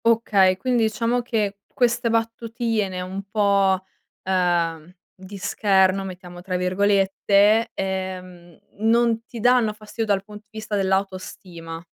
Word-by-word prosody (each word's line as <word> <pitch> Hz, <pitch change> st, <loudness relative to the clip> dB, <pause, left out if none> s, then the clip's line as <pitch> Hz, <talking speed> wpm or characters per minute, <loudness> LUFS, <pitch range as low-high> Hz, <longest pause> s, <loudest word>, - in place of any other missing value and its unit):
Okay, 205 Hz, -5 st, +3 dB
quindi 235 Hz, +1 st, +1 dB
diciamo 235 Hz, +3 st, 0 dB
che 210 Hz, -4 st, -2 dB
queste 240 Hz, -1 st, +1 dB
battutine 225 Hz, -3 st, -1 dB
un 185 Hz, +2 st, -5 dB
po', 200 Hz, -3 st, +2 dB, 0.4 s
ehm, 175 Hz, -3 st, 0 dB, 0.2 s
di 190 Hz, +2 st, -11 dB
scherno, 195 Hz, -2 st, +2 dB
mettiamo 180 Hz, -2 st, -9 dB
tra 185 Hz, 0 st, -3 dB
virgolette, 200 Hz, +3 st, +2 dB
ehm, 185 Hz, -3 st, -5 dB, 0.2 s
non 230 Hz, +1 st, +2 dB
ti 235 Hz, -, -9 dB
danno 245 Hz, -2 st, +3 dB
fastidio 215 Hz, +1 st, -6 dB
dal 200 Hz, -3 st, 0 dB
pun 210 Hz, +1 st, -11 dB
di 210 Hz, 0 st, -19 dB
vista 220 Hz, -1 st, -5 dB
dell'autostima. 185 Hz, -4 st, -3 dB
200 Hz, 120 wpm, -23 LUFS, 185-225 Hz, 0.4 s, Okay